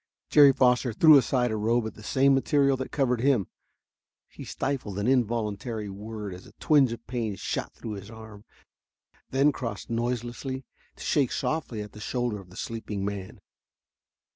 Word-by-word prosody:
Jerry 145 -2 +8
Foster 125 -2 +2
threw 155 +7 +7
aside 125 -3 +3
a - - -1
robe 115 +2 +1
of 110 - -5
the - - -14
same 135 +5 +3
material 140 0 +3
that 130 - -5
covered 125 -5 +1
him. 130 -7 +3 0.8
He - - -10
stifled 130 -8 -3
an 100 - -1
involuntary 115 -3 0
word 105 0 -7
as 90 - -11
a - - -17
twinge 140 -5 +3
of 115 0 -7
pain 115 -5 -3
shot - - -4
through 110 - -7
his 100 0 -7
arm, 110 -2 -11 0.9
then 140 +3 +3
crossed 115 -5 -6
noiselessly 120 +3 -3 0.3
to - - -10
shake 140 -5 +1
softly 130 -9 -2
at 105 - -11
the 105 - -12
shoulder 120 -1 -2
of 95 -2 -14
the 90 - -14
sleeping 110 -3 -4
man. 100 -2 -6
120 Hz, 165 wpm, -27 LUFS, 105-130 Hz, 0.9 s, Jerry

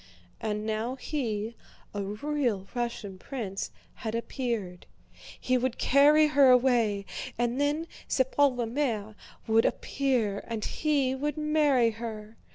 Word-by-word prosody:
And 210 -1 -2
now 220 +3 -2
he, 230 -6 -3 0.4
a 205 - -2
real 215 0 -1
Russian 235 -6 -4
prince, 205 -7 -4 0.2
had 220 0 -4
appeared. 230 -7 -3 0.5
He 255 0 +1
would 255 0 -1
carry 295 +3 +5
her 285 -3 +5
away 240 -6 +3 0.3
and 240 +3 0
then 295 +3 +1 0.2
sa 260 - +3
pauvre 260 -2 +2
mère 225 -4 -2 0.3
would 225 0 +4
appear 245 -8 0
and 225 -2 -3
he 285 -4 +1
would 295 +3 -2
marry 300 -6 +3
her. 220 -1 -7
240 Hz, 125 wpm, -28 LUFS, 215-280 Hz, 0.5 s, carry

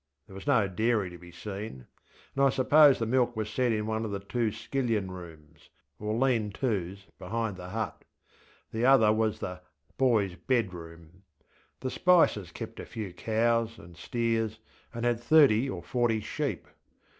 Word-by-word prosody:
There 100 - -15
was 95 +8 -10
no 115 -8 +4
dairy 105 0 0
to 90 - -10
be 85 0 -13
seen, 95 - -7 0.5
and 140 - +1
I 135 - +6
suppose 145 +2 +6
the 115 - -1
milk 120 +1 +1
was 110 -1 -3
set 125 +2 +1
in 105 -1 -1
one 110 0 -2
of 110 - -3
the 100 -1 -3
two 105 +3 -1
skillion 115 -3 -2
rooms, 80 -4 -12 0.3
or 105 +1 -2
lean 115 -4 +1
toŌĆÖs 100 -5 -2 0.2
behind 110 +2 -3
the 90 0 -9
hut, 110 +2 -4 0.7
ŌĆöthe 110 +1 -1
other 125 -5 +6
was 110 -1 0
ŌĆśthe 90 0 -5 0.4
boysŌĆÖ 110 -8 +2
bedroomŌĆÖ. 85 -9 -2 0.7
The 130 - -3
Spicers 165 - +3
kept - - -8
a - - -6
few 105 -5 -6
cows 115 +3 0
and 90 -4 -14
steers, 115 +3 -1 0.3
and 115 0 -4
had 120 -1 +1
thirty 135 -2 +5
or 90 -8 -5
forty 120 -3 +1
sheep. - - -3
110 Hz, 165 wpm, -29 LUFS, 95-120 Hz, 0.7 s, I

